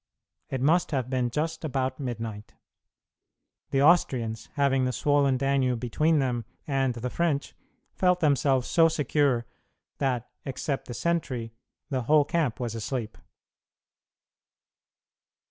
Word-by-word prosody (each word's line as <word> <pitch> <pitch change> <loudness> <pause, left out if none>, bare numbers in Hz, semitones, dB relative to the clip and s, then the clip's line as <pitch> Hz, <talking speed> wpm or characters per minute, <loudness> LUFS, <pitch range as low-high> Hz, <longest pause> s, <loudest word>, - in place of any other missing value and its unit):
It 130 - -3
must 170 +6 +3
have 130 -4 -2
been 125 -2 +1
just 160 +6 -2
about 130 -3 -2
midnight. 115 -5 -5 1.1
The 135 0 +2
Austrians, 125 -9 +2
having 135 -2 +2
the 125 - 0
swollen 140 -1 +2
Danube 130 -2 +1
between 150 +7 +1
them 125 -4 0 0.2
and 135 -5 0
the 120 +1 -3
French, 160 -5 -1 0.4
felt 180 -1 +2
themselves 135 -4 +2
so 165 -1 +5
secure 145 -5 +1 0.5
that, 125 -4 0 0.2
except 135 +1 -3
the 120 - -6
sentry, 130 -10 -2 0.4
the 130 -2 0
whole 145 +4 +4
camp 155 -9 0
was 120 -3 -3
asleep. 115 0 -4
135 Hz, 120 wpm, -27 LUFS, 125-150 Hz, 1.1 s, so